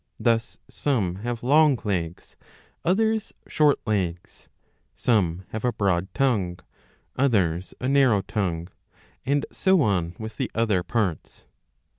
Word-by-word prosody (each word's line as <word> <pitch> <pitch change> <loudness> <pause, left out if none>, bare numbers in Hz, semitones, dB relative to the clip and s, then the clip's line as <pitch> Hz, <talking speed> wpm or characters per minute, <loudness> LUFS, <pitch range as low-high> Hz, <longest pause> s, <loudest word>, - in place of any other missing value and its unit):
Thus 115 0 +1
some 105 -11 -1
have 120 +3 -4
long 145 +1 +5
legs, 90 -5 -3 0.5
others 220 +4 +1
short 150 -2 +3
legs; 90 -6 -3 0.5
some 95 -7 +1
have 110 - -5
a 125 - +2
broad 95 -4 0
tongue, 105 -9 +1 0.6
others 95 -10 +1
a 125 - -2
narrow 130 -7 +4
tongue; 90 -5 -2 0.6
and 140 +1 +1
so 190 -5 +3
on 90 -6 0
with 110 0 -7
the - - -2
other 110 -5 +2
parts. 95 -5 -3
110 Hz, 120 wpm, -25 LUFS, 90-130 Hz, 0.6 s, long